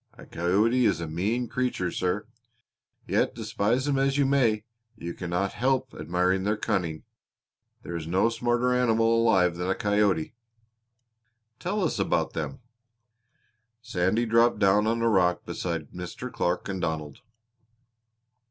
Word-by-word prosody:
A - - -13
coyote 105 +9 +1
is - - +1
a 85 - -3
mean 105 +10 -1
creature, 125 -9 -1
sir. 90 -1 -1 0.8
Yet - - 0
despise 120 +7 -1
'em 140 -2 +1
as 135 +1 +1
you 140 - +3
may 120 -6 +2 0.3
you 85 -5 -6
cannot 90 +2 -2
help 130 0 0
admiring 90 +4 0
their 105 +2 0
cunning. 90 -8 -2 0.8
There 85 - -6
is 80 -1 -5
no 95 +7 +2
smarter 120 +2 +1
animal 115 -2 +3
alive 95 -6 +3
than 90 +1 -2
a 95 - +1
coyote!" 100 -5 +1 1.3
"Tell 195 +3 -1
us 160 - -1
about - - 0
them." - - -4 1.2
Sandy 95 +3 0
dropped 115 +1 +3
down 105 +2 +3
on 115 +1 0
a - - +3
rock 90 -5 +2
beside 80 -5 -4
Mr. 90 +8 -7
Clark 90 +1 -1
and 95 -2 -4
Donald. 80 -3 -3
105 Hz, 140 wpm, -27 LUFS, 90-120 Hz, 1.3 s, you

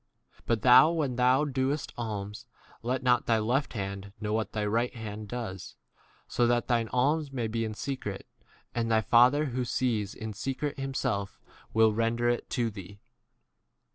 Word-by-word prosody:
But 115 -3 0
thou, 130 +4 +8
when 150 -7 -1
thou 125 +4 +3
doest 135 +1 -1
alms, 105 0 -5 0.3
let 125 +2 -2
not 125 -1 +3
thy 115 - +4
left 125 +6 0
hand 100 -2 -5
know 105 0 -2
what 110 0 -1
thy 105 -1 -1
right 115 +4 +1
4 120 - -11
hand 105 -1 -6
does; 110 -6 -6 0.5
so 120 - +2
that 120 0 +1
thine 115 -2 +1
alms 145 +4 +1
may 125 -4 -2
be 115 +1 -1
in 110 -1 -4
secret, 110 -7 -5 0.5
and 115 -1 -1
thy 110 -1 +3
Father 125 +7 +5
who 125 0 0
sees 115 -5 -1
in 110 -1 -6
secret 135 +6 -3
himself 130 -7 -2 0.3
will 110 -1 +4
render 115 +2 0
[it] 120 - -1
to 120 -3 0
thee. 100 0 -10
120 Hz, 170 wpm, -29 LUFS, 110-130 Hz, 0.5 s, thou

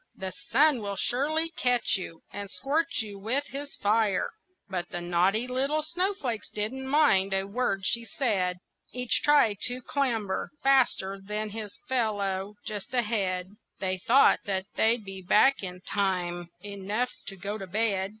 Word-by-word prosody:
The 190 0 -4
sun 275 +5 +2
will 200 -1 -3
surely 310 +9 +1
catch 245 -7 +2
you, 170 -4 -6
and 200 -1 -5
scorch 295 +2 0
you 205 -2 -8
with 250 +8 0
his 280 +1 -6
fire." 210 -2 +1 0.4
But 180 -3 -3
the 175 - -4
naughty 180 +6 +2
little 275 +5 0
snowflakes 335 - -2
didn't 250 +6 -3
mind 215 -10 +4
a 195 0 0
word 200 -2 -1
she 235 +3 +1
said, 200 -6 0 0.3
Each 250 -1 +1
tried 285 -9 +4
to 250 0 -3
clamber 230 -9 -1
faster 245 -8 +3
than 210 +1 -3
his 210 -1 -6
fellow 205 -6 -1
just 210 +4 -5
ahead; 195 -6 0 0.3
They 185 -1 -1
thought 255 +9 +5
that 190 -2 -1
they'd 225 -1 +2
be 195 -1 -7
back 215 +9 +4
in 180 -2 -6
time 175 -3 -1 0.2
enough 205 +5 -2 0.2
to 195 - -5
go 200 +3 -4
to 195 - -6
bed. 195 -1 0
210 Hz, 150 wpm, -28 LUFS, 195-255 Hz, 0.4 s, thought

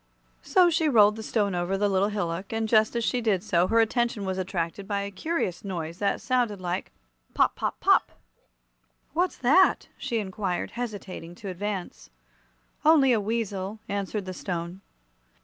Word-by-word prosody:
So 360 -2 +4
she 320 -1 +2
rolled 210 -5 +6
the 220 - -7
Stone 210 -3 0
over 175 +2 -1
the 205 +1 +2
little 195 0 +2
hillock, 190 -3 -3
and 225 0 -1
just 220 +1 +3
as 235 - 0
she 245 +2 0
did 205 -5 +1
so 175 -4 +2
her 230 +3 +3
attention 230 -2 +1
was 190 0 -2
attracted 185 +1 -3
by 200 -1 -1
a 200 - -5
curious 195 - -2
noise 170 -4 -5
that 200 -1 0
sounded 245 -6 0
like 180 +1 -3 0.4
"Pop! - - +3
pop! - - -3
pop!" - - +3 1.0
"What's 355 +3 0
that?" 300 +10 +4
she 255 -4 -2
inquired, 190 -3 -3
hesitating 200 -7 -6
to 200 +2 -7
advance. 190 - -5 0.7
"Only 295 -5 +6
a 220 - +2
weasel," 205 -2 -3
answered 200 0 -3
the 185 - -5
Stone. 175 0 -5
205 Hz, 165 wpm, -26 LUFS, 185-230 Hz, 1.0 s, rolled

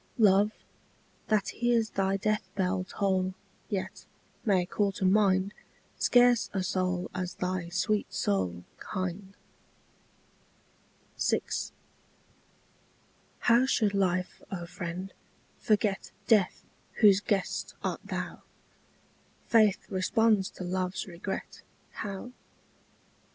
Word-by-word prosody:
Love, 205 -1 +5 0.8
that 215 -3 +2
hears 235 -2 +1
thy 195 0 +1
death 210 -1 -1
bell 185 -1 0
toll 190 -1 0 0.3
Yet, 195 -2 -4 0.4
may 190 -6 +3
call 200 +2 0
to 190 - -2
mind 195 0 +3 0.5
Scarce 245 -2 +5
a 190 -2 0
soul 185 -1 -1
as 180 -1 -4
thy 180 -1 -2
sweet 205 +4 0
soul 90 -3 -1 0.2
Kind. 190 +1 -4 1.8
VI. - - +3 2.0
How 240 +2 +5
should 215 -6 +2
life, 185 -2 0
O 175 -3 -4
friend, 180 +2 -6 0.5
forget 210 -3 +1 0.2
Death, 210 -6 +3 0.4
whose 200 -3 +7
guest 200 -2 -1
art - - -2
thou? - - -5 1.0
Faith 215 -4 +4
responds 205 +1 +2
to - - -9
love's 185 +1 -2
regret, 185 +2 -6 0.3
How? 205 +3 -6
195 Hz, 100 wpm, -29 LUFS, 185-210 Hz, 2.0 s, whose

